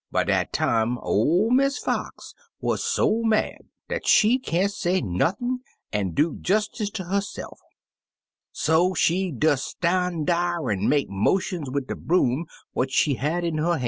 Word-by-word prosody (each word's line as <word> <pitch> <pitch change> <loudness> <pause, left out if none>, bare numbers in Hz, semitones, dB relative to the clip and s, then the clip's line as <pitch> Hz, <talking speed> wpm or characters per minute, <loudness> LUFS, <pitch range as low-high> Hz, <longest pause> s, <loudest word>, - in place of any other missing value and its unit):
By - - +1
dat - - 0
time 115 +1 +1
ol' 170 - +1
Miss 275 +2 +3
Fox - - -4 0.3
wuz - - 0
so 225 - +1
mad 220 -1 +1 0.3
dat - - -4
she 235 +5 +5
can't 195 -4 0
say 185 -1 0
nothin' 195 - -1 0.3
an' 100 -4 -1
do 155 +2 +1
jestice 210 +2 0
ter 205 -2 -5
her 195 +3 0
se'f, 205 - -8 0.9
so 175 +4 +2
she 185 +2 +1
des 145 +2 +2
stan' 175 +2 -1
dar 175 -4 0
an' 95 -2 0
make 145 -1 +2
motions 150 - 0
wid 140 0 -2
de - - -4
broom 160 -3 +1 0.2
what 130 - -1
she 140 +2 +2
had 155 +7 -1
in 165 -2 -1
her 170 +3 +1
ban'. - - -3
170 Hz, 160 wpm, -24 LUFS, 140-195 Hz, 0.9 s, she